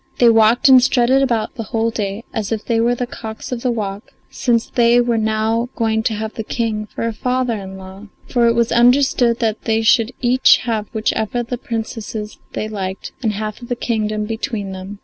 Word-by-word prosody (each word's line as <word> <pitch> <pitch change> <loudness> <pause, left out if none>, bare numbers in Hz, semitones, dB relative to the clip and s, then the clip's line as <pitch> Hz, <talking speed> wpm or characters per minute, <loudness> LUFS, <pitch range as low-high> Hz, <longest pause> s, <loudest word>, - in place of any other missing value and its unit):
They 240 - +6
walked 225 +2 +4
and 260 -2 +8
strutted 255 +1 +3
about 230 -5 0
the 245 - -6
whole 225 +1 -1
of - - -9
the - - -5
day, 200 +2 -3
as 220 -3 -3
if 220 -1 -2
they 230 -1 +1
were 240 +2 +2
the 245 - -2
cocks 220 -2 -8
of 245 -2 -3
the 250 - 0
walk, 205 -3 -4 0.2
since 235 -2 +1
they 240 0 +3
were 240 -1 +1
now 220 +2 0
going 220 -1 +1
to 220 -1 -1
have 220 +1 -4
the 225 - -5
King 215 -2 -2
for 230 +1 -3
father 250 +2 -1
in 190 -3 -7
law. 190 +2 -11 0.2
For 240 -2 +2
it 230 - +3
was 235 -1 +1
understood 245 -1 +4
they 225 -1 0
should 230 +1 +3
each 255 +1 +5
have 220 -3 -1
whichever 220 +1 -1
of 235 - -9
the 245 - -2
Princesses 225 -2 -5
they 215 - -3
liked 195 -3 -5
and 220 -4 0
half 215 +1 -4
the 245 0 -4
kingdom 215 -3 -2
between 220 -2 -4
them. 190 +2 -8
225 Hz, 210 wpm, -19 LUFS, 215-240 Hz, 0.2 s, and